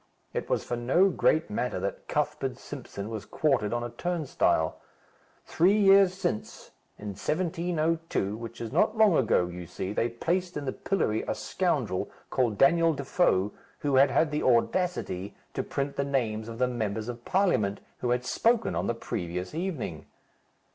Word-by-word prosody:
It - - -3
was - - +1
for 120 - -3
no 135 +11 +3
great 160 -4 +2
matter 125 +4 -1
that - - -4
Cuthbert - - -1
Simpson 100 +1 -7
was 110 -3 -4
quartered 135 -9 +1
on 120 0 -1
a 120 - -5
turnstile. 150 - 0 0.6
Three 190 +5 +3
years 195 -2 +6
since, 175 - -4 0.3
in 105 - -6
1702, 165 - -1
which 115 0 -8
is 115 -2 -5
not 215 - +2
long 215 -5 +6
ago, 110 -9 +3
you 90 -1 -7
see, 95 +4 -4
they 115 +2 +1
placed 175 +9 -1
in 145 - -4
the 130 - -1
pillory 110 - 0
a - - -1
scoundrel, - - -1 0.2
called 120 -5 +1
Daniel 165 +4 +5
Defoe, 135 - +1 0.3
who 140 -2 +2
had 135 +1 +6
had 155 +3 +2
the 150 - -1
audacity 120 - 0 0.2
to - - -1
print 140 0 -3
the 140 - +1
names 115 -6 -1
of 115 - -7
the 125 +1 +2
Members 110 -3 -2
of 120 -1 -6
Parliament 145 - +1 0.2
who 125 - -1
had 125 +1 +1
spoken 230 - +2
on - - -1
the 120 - 0
previous 90 -4 -4
evening. 155 - -4
130 Hz, 165 wpm, -28 LUFS, 110-170 Hz, 0.6 s, years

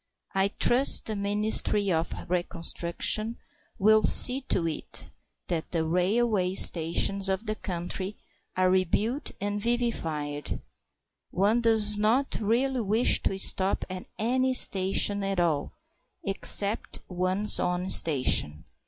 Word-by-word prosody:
I 195 0 +1
trust 245 +6 +5
the 215 - -4
Ministry 205 0 -1
of 165 0 -2 0.2
Reconstruction 175 +5 -2 0.4
will 215 +2 +3
see 255 +4 +4
to 170 -3 -1
it 160 - -4 0.3
that 165 -3 -5
the 165 -2 -2
railway 185 +2 -1
stations 185 +4 +3
of 190 +3 -3
the 215 - -3
country 185 0 -6 0.4
are 185 0 +2
rebuilt 205 - -2
and 205 +1 -4
vivified. 160 - -4 0.7
One 210 +6 0
does 215 -2 +3
not 235 +6 -1
really 245 +4 -1
wish 220 +3 +2
to 190 - -3
stop 195 0 -1
at 185 0 -8
any 255 +3 -1
station 195 0 +2
at 195 -1 -3
all 160 -5 -2 0.5
except 200 +1 +1
one's 185 +3 +1
own 180 +1 -3
station. 130 - +3
195 Hz, 120 wpm, -26 LUFS, 180-220 Hz, 0.7 s, trust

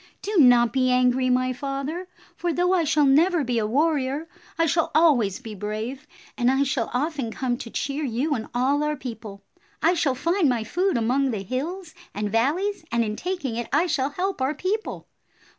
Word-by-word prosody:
Do 415 0 -2
not 245 -4 +6
be 255 -1 +2
angry, 250 0 +3
my 255 0 +2
father, 275 +7 -4 0.3
for 350 - -1
though 355 +2 +1
I 345 -3 +2
shall 295 0 +3
never 320 +4 +4
be 245 -2 0
a 210 - 0
warrior, 290 +3 0 0.3
I 330 - +3
shall 330 +1 +1
always 265 - +4
be 225 -4 -8
brave, 215 +8 -5 0.3
and 245 -1 +2
I 270 +1 +3
shall 270 -4 -1
often 275 -1 -2
come 245 +2 -2
to 235 - -8
cheer 280 +5 -3
you 270 +4 -1
and 225 -5 -3
all 275 +4 +2
our 300 0 0
people. 225 -6 -8 0.4
I 335 - +3
shall 305 -7 +1
find 335 +3 +1
my 240 -3 0
food 360 - 0
among 255 +4 +1
the 210 -5 -3
hills 310 - -4 0.2
and 205 0 -2
valleys, 315 - 0
and 235 0 +2
in 210 0 -3
taking 350 -6 -3
it 235 - -3
I 340 - +3
shall 290 -6 0
help 365 +2 -3
our 270 +4 0
people. 420 +4 -3
270 Hz, 190 wpm, -24 LUFS, 245-325 Hz, 0.4 s, not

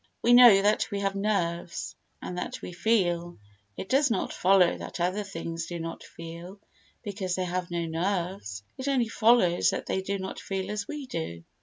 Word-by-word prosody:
We 240 - +5
know 240 -5 +9
that 210 +1 +2
we 200 -2 -3
have 195 -1 0
nerves 185 -5 -2 0.3
and 180 0 -4
that - - -5
we - - -6
feel, 175 -3 0 0.4
it - - -5
does 270 +4 +3
not 230 - -1
follow 185 -1 +4
that - - -7
other 185 +4 0
things 165 -3 -5
do 175 - -5
not 165 0 -6
feel 170 +4 -10 0.4
because 195 -4 -3
they 185 - -1
have 180 0 -3
no 170 -1 -2
nerves—it 170 - -3
only 255 -5 +1
follows 220 -7 +4
that - - -3
they 190 - -1
do 200 +1 -2
not 190 0 -6
feel 190 0 -4
as 210 -1 -3
we 300 -2 -5
do. 85 - -5
190 Hz, 180 wpm, -27 LUFS, 170-210 Hz, 0.4 s, know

